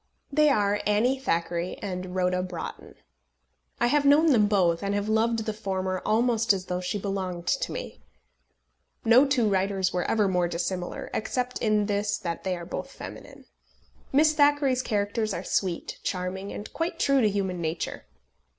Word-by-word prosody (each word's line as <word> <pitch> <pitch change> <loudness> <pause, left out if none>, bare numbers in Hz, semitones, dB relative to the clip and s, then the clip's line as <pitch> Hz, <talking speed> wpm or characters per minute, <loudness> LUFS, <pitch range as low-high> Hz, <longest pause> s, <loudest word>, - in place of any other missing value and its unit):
They 300 +1 +4
are 205 -5 +2
Annie 235 +6 +2
Thackeray 170 -6 -1
and 185 -1 -5
Rhoda 180 0 +1
Broughton. 180 -2 -7 0.8
I - - +3
have 285 +4 +3
known 295 +3 +5
them 215 -5 +4
both, 180 -5 +2
and 200 0 -1
have 205 0 -1
loved 220 +1 +1
the 215 - -2
former 190 -3 -2
almost 230 -1 +2
as 185 -2 -4
though 180 0 -3
she 180 +3 -2
belonged 190 -3 -3
to - - 0
me. - - -7 1.0
No 250 +5 +6
two 255 -5 +2
writers 190 -1 +1
were 180 -1 0
ever 215 -3 +2
more 180 -2 +1
dissimilar, 175 +1 -4
except 250 +3 -2
in 215 -2 +2
this 205 0 0
that 170 -1 -5
they 185 -2 -1
are 170 - -8
both - - -5
feminine. - - -10 0.7
Miss 305 +3 +4
Thackeray's 290 -3 +3
characters 210 -1 -1
are - - -4
sweet, 180 -4 -2
charming, 185 +1 -3
and 210 - -8
quite 330 +1 -2
true 275 -1 +3
to 215 - +4
human 190 -3 -2
nature. 160 - -3
205 Hz, 165 wpm, -27 LUFS, 185-235 Hz, 1.0 s, No